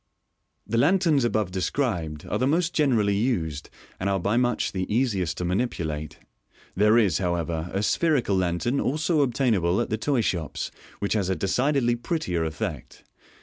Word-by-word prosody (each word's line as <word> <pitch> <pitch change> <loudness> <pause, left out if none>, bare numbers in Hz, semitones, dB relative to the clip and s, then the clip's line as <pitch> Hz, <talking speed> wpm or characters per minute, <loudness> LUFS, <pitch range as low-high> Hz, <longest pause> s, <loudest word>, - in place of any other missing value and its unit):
The 115 +2 0
lanterns 165 -3 +3
above 110 -5 0
described 90 - -2
are 105 - -2
the 130 - +2
most 170 +4 +1
generally 115 -9 +2
used, 90 - -1 0.3
and 100 - -1
are 95 0 +1
by 100 +5 0
much 120 0 +1
the 95 0 -3
easiest 100 -8 0
to 90 - -2
manipulate. 85 - -2 0.6
There 105 +3 +4
is, 100 -9 +3
however, 85 -2 -2
a 100 +2 -1
spherical 140 - +2
lantern 90 +8 0
also 155 +3 +1
obtainable 115 -9 +1
at - - -2
the 110 - -1
toy 135 -1 +1
shops, 85 -8 -2 0.3
which 100 - -1
has 100 -4 0
a 95 - +1
decidedly 125 +5 +1
prettier 115 - -2
effect. 80 -1 -5
105 Hz, 155 wpm, -25 LUFS, 90-130 Hz, 0.6 s, There